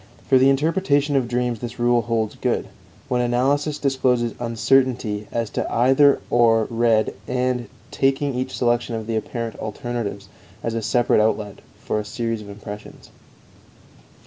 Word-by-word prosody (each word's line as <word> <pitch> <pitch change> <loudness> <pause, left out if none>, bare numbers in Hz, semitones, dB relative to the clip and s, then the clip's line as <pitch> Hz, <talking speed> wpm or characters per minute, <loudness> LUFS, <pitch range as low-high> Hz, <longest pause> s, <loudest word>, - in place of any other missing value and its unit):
For 130 - +5
the 135 +1 +5
interpretation 145 0 +1
of 130 -3 +2
dreams 120 -1 -1
this 120 0 -6
rule 120 0 +3
holds 115 -1 -1
good: - - -2 0.4
When 125 -2 +1
analysis 140 +5 +1
discloses 130 -4 +1
uncertainty, 115 -2 +1
as 115 -2 -2
to - - -3
either 135 +4 +4
or 115 -2 +4
read 115 -2 +2
and, 125 -2 -1 0.2
taking 135 +1 +1
each 125 +1 -3
section 120 -1 +1
of 110 -1 -4
the 115 0 -2
apparent 115 +1 -4
alternatives 110 -2 -4 0.4
as 115 - -2
a 115 - -2
separate 120 0 +2
outlet 105 -2 -1 0.2
for 105 - -2
a - - -3
series 115 +1 -3
of 100 - -11
impressions. 105 0 -10
120 Hz, 145 wpm, -22 LUFS, 115-130 Hz, 0.4 s, For